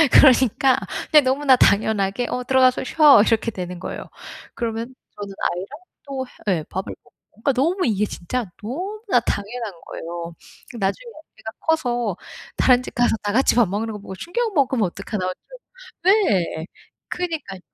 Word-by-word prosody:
그러니까 260 Hz, 0 st, +5 dB, 0.3 s
이제 305 Hz, -2 st, +7 dB
너무나 265 Hz, 0 st, +3 dB
당연하게 205 Hz, +1 st, +2 dB
"어. 250 Hz, -, -3 dB
들어가서 255 Hz, 0 st, +3 dB
쉬어." 290 Hz, -5 st, +6 dB
이렇게 225 Hz, 0 st, +1 dB
되는 180 Hz, -4 st, -6 dB
거예요. -, -, -6 dB, 0.5 s
그러면 230 Hz, +2 st, -4 dB, 0.2 s
저는 200 Hz, -1 st, -7 dB, 0.2 s
아이랑 180 Hz, +3 st, -5 dB, 0.4 s
또 265 Hz, -2 st, -4 dB, 0.2 s
해 185 Hz, -4 st, +3 dB
예. 155 Hz, -, -6 dB
밥을 190 Hz, +1 st, -5 dB
먹고. -, -, -26 dB, 0.2 s
그러니까 225 Hz, +7 st, 0 dB
너무 340 Hz, +9 st, +1 dB
이게 210 Hz, -3 st, +1 dB
진짜 210 Hz, +3 st, -4 dB
너무나 370 Hz, -, -1 dB
당연한 220 Hz, 0 st, -3 dB
거예요. 170 Hz, 0 st, -7 dB, 0.4 s
'나중에 210 Hz, -, -2 dB, 0.3 s
애가 220 Hz, -, -7 dB
커서 245 Hz, -, 0 dB, 0.4 s
다른 250 Hz, -1 st, +4 dB
집 -, -, -9 dB
가서 240 Hz, -2 st, +2 dB
다 205 Hz, -, -1 dB
같이 260 Hz, +5 st, +3 dB
밥 235 Hz, -5 st, +4 dB
먹는 215 Hz, +4 st, -3 dB
거 210 Hz, -, -6 dB
보고 200 Hz, -1 st, -9 dB
충격 445 Hz, -, -2 dB
먹으면 260 Hz, -, +2 dB
어떡하나?' 195 Hz, +1 st, -4 dB
할 185 Hz, -, -2 dB
정 -, -, -16 dB, 0.5 s
네. 185 Hz, -, +1 dB, 0.4 s
그러니까요. 320 Hz, -, -4 dB
240 Hz, 340 characters per minute, -22 LUFS, 200-270 Hz, 0.5 s, 이제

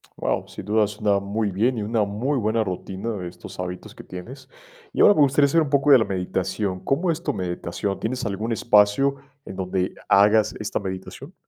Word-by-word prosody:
Guau, -, -, -2 dB
sin -, -, -9 dB
duda, 105 Hz, 0 st, +2 dB
suena 105 Hz, -1 st, 0 dB
muy 100 Hz, +1 st, -2 dB
bien, 115 Hz, +6 st, +1 dB
y -, -, -2 dB
una 110 Hz, 0 st, +1 dB
muy 120 Hz, +8 st, -1 dB
buena 110 Hz, +1 st, +1 dB
rutina 95 Hz, +3 st, -5 dB
de 90 Hz, -4 st, -5 dB
estos 90 Hz, +1 st, -11 dB
hábitos 90 Hz, 0 st, -6 dB
que -, -, -11 dB
tienes. 130 Hz, +9 st, -10 dB, 0.4 s
Y -, -, 0 dB
ahora 205 Hz, -, +8 dB
me 150 Hz, -, +2 dB
gustaría 140 Hz, +1 st, +4 dB
saber 165 Hz, +3 st, +3 dB
un 145 Hz, -, -4 dB
poco 140 Hz, 0 st, +3 dB
de 130 Hz, -, +9 dB
la 110 Hz, -, +1 dB
meditación, 95 Hz, 0 st, -2 dB
¿cómo 165 Hz, -, 0 dB
es 165 Hz, +1 st, -4 dB
tu -, -, -1 dB
meditación? 90 Hz, +1 st, -3 dB
¿Tienes 125 Hz, +1 st, -3 dB
algún 105 Hz, +3 st, -3 dB
espacio 110 Hz, +5 st, +3 dB, 0.3 s
en 95 Hz, -, -8 dB
donde 95 Hz, 0 st, -2 dB, 0.2 s
hagas 105 Hz, +2 st, +4 dB
esta 110 Hz, -, -2 dB
meditación? 95 Hz, -, -7 dB
105 Hz, 200 wpm, -23 LUFS, 95-130 Hz, 0.4 s, de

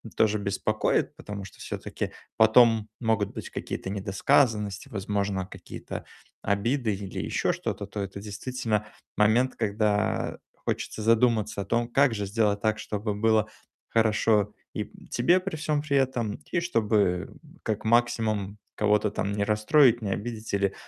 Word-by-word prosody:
тоже 110 Hz, -1 st, +3 dB
беспокоит. 100 Hz, +2 st, 0 dB
Потому 105 Hz, -1 st, -7 dB
что -, -, -14 dB
всё-таки -, -, -5 dB, 0.3 s
потом 110 Hz, -1 st, +6 dB
могут 110 Hz, -4 st, +1 dB
быть -, -, -6 dB
какие-то 95 Hz, -, -5 dB
недосказанности, 105 Hz, +1 st, +1 dB
возможно, 100 Hz, -2 st, -2 dB
какие-то -, -, -8 dB, 0.4 s
обиды 110 Hz, +3 st, 0 dB
или 95 Hz, -1 st, -6 dB
ещё -, -, 0 dB
что-то, 100 Hz, -, -4 dB
то 105 Hz, +1 st, -7 dB
это 100 Hz, 0 st, -5 dB
действительно 105 Hz, +1 st, -2 dB, 0.3 s
момент, 115 Hz, +5 st, +3 dB
когда 105 Hz, -1 st, 0 dB, 0.2 s
хочется 110 Hz, -, -4 dB
задуматься 110 Hz, -2 st, +2 dB
о -, -, -5 dB
том, 120 Hz, 0 st, 0 dB
как 135 Hz, 0 st, +3 dB
же 105 Hz, -2 st, -2 dB
сделать 100 Hz, 0 st, +1 dB
так, 110 Hz, -1 st, +1 dB
чтобы 105 Hz, 0 st, -3 dB
было 110 Hz, 0 st, +3 dB, 0.4 s
хорошо 110 Hz, -2 st, +2 dB, 0.2 s
и -, -, -2 dB, 0.2 s
тебе 170 Hz, +10 st, +3 dB
при 190 Hz, -2 st, -4 dB
всём 150 Hz, -1 st, 0 dB
при 140 Hz, -2 st, +1 dB
этом. 120 Hz, -5 st, 0 dB, 0.2 s
И 170 Hz, -, +2 dB
чтобы 105 Hz, -, +1 dB, 0.3 s
как 110 Hz, -1 st, -2 dB
максимум 110 Hz, -3 st, +1 dB, 0.2 s
кого-то 105 Hz, 0 st, +2 dB
там 100 Hz, 0 st, -2 dB
не 100 Hz, 0 st, 0 dB
расстроить, 115 Hz, +4 st, +4 dB
не 105 Hz, -, -3 dB
обидеть 110 Hz, +2 st, -4 dB
или, 100 Hz, -1 st, +1 dB
110 Hz, 140 wpm, -27 LUFS, 100-115 Hz, 0.4 s, потом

